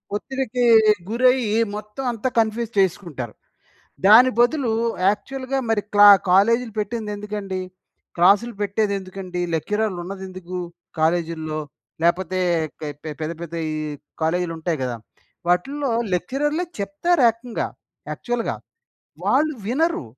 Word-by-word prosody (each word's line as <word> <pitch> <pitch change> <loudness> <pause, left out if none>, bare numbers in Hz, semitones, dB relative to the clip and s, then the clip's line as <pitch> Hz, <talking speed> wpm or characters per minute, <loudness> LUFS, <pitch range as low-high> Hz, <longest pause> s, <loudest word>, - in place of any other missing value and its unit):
ఒత్తిడికి 255 +1 -2 0.5
గురయ్యి 240 -2 +3 0.2
మొత్తం 210 +5 -7
అంతా 235 +3 -2
కన్‌ఫ్యూజ్ 225 +1 0
చేసుకుంటారు. 170 - -1 0.7
దాని 240 +5 +8
బదులు 240 +1 +3 0.4
యాక్చువల్‌గా, 260 +6 -2
మరి 215 -2 +2
క్లా 205 0 +9 0.2
కాలేజీలు 230 +5 +4
పెట్టింది 215 0 -3
ఎందుకండి? 205 -2 -4 0.6
క్లాసులు 200 +7 +4
పెట్టేది 205 +1 0
ఎందుకండి? 185 -1 -6
లెక్చరర్‌లు 210 +4 -1
ఉన్నది 190 +1 -7
ఎందుకు, 185 -1 -7 0.4
కాలేజీల్లో? 160 -1 0 0.5
లేకపోతే 180 +1 +1 0.4
పె 150 +1 -6
పెద్ద 155 +1 -2
,పెద్ద 170 -1 -7 0.2
ఈ - - -3 0.5
కాలేజీలు 165 +1 0
ఉంటాయి 160 -1 -2
కదా! 125 -2 -2 0.5
వాటిల్లో 270 +10 +1 0.2
లెక్చరర్‌లే 295 - -1 0.2
చెప్తారు 255 - +1
ఏకంగా 230 +1 -4 0.4
యాక్చువల్‌గా. 240 -1 -2 0.7
వాళ్ళు 305 +3 +2
వినరు, 315 - 0
205 Hz, 105 wpm, -22 LUFS, 180-240 Hz, 0.7 s, క్లా